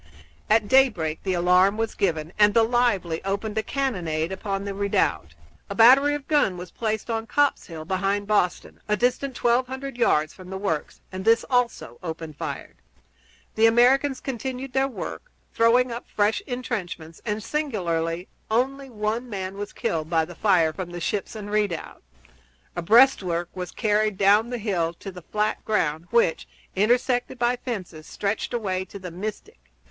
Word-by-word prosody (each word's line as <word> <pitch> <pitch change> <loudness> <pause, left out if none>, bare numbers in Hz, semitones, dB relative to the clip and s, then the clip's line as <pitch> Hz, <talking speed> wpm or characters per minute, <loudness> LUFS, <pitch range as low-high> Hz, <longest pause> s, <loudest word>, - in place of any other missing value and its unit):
At 215 -1 +4
daybreak 205 -12 +3
the 190 - -1
alarm 180 +3 +4
was 225 0 -1
given, 160 -3 -1
and 210 0 +5
the 230 - +6
Lively 225 -8 +1
opened 200 +2 -2
a - - +1
cannonade 180 - -2
upon 195 0 -3
the 200 - -3
redoubt. 85 - 0 0.3
A 200 - -4
battery 270 +6 +6
of 290 -2 -7
guns 290 - +2
was 180 0 -8
placed 220 0 -3
on 225 0 -2
Copp's 290 +3 +1
Hill, 160 -2 -8
behind 195 +3 -1
Boston, 200 -4 0 0.2
distant 250 +2 0
twelve 240 +2 +2
hundred 265 0 -6
yards 155 -10 +2
from 185 -1 -12
the 190 - -4
works, 190 -7 -3
and 190 0 -5
this, 225 +2 +4
also, 245 -1 0
opened 160 -3 -6
fire. - - -6 0.8
The 220 +1 +5
Americans 260 +4 +4
continued 260 0 -5
their 270 0 +2
work, 275 - -7 0.2
throwing 240 +2 +4
up 235 +1 -6
fresh 210 +1 +1
intrenchments; 185 -10 -5
and, 210 -1 -3
singularly, 180 - -2 0.2
only 270 +4 0
one 225 +2 -3
man 190 -2 -4
was 205 0 -6
killed 160 -1 -2
by 165 -2 +2
the 175 - -10
fire 175 -5 +3
from 185 0 -5
the 175 0 -6
ships 200 +5 -3
and 205 -1 -7
redoubt. 205 -6 -2 0.7
A 175 - -2
breastwork 185 -5 +4
was 180 -1 -5
carried 215 -2 0
down 205 +4 +4
the 245 - -3
hill 180 -7 -1
to 195 - -8
the 180 -1 -10
flat 210 +5 -2
ground 165 -6 -1
which, 235 -8 +2 0.3
intersected 245 +5 +1
by 240 +1 +2
fences, 185 -11 -6
stretched 200 +1 -2
away 195 -6 -1
to 195 - -10
the 185 -2 -8
Mystic. 195 - -6
210 Hz, 165 wpm, -24 LUFS, 180-240 Hz, 0.8 s, the